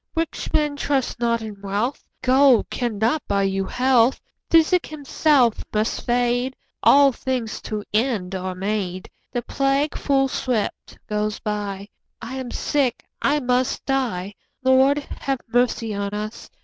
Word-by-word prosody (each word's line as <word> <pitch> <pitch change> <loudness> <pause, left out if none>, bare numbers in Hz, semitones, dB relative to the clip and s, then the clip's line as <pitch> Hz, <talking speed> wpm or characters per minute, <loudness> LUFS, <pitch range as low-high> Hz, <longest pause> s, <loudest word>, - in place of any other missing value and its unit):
Rich 330 0 -2
men, 295 -1 +1
trust 275 -4 -1
not 235 -1 +1
in 210 -2 -8
wealth, 205 +7 -2 0.2
Gold 260 -1 +4
cannot 235 +4 0
buy 200 -1 +1
you 195 0 0
health; 250 +1 +3 0.3
Physic 330 +2 +4
himself 285 -4 +2
must 215 +1 -1
fade; 245 +1 +1 0.3
10 - - +7
All 280 0 +6
things 250 -3 -3
to 215 -1 -4
end 215 -5 0
are 185 0 -3
made; 190 -1 -3 0.2
The 245 -1 -2
plague 275 +3 0
full 270 -1 +2
swift 245 -5 -2
goes 210 0 -1
by; 205 -2 -4 0.3
I 255 +4 -6
am 260 -2 -5
sick, 270 -1 -1 0.2
I 295 +1 +2
must 250 0 0
die— 230 -8 -1 0.3
Lord, 260 +2 +5 0.2
have 270 -2 -1
mercy 240 -2 +1
on 200 0 -3
us! 215 +1 -6
245 Hz, 140 wpm, -22 LUFS, 210-270 Hz, 0.3 s, 10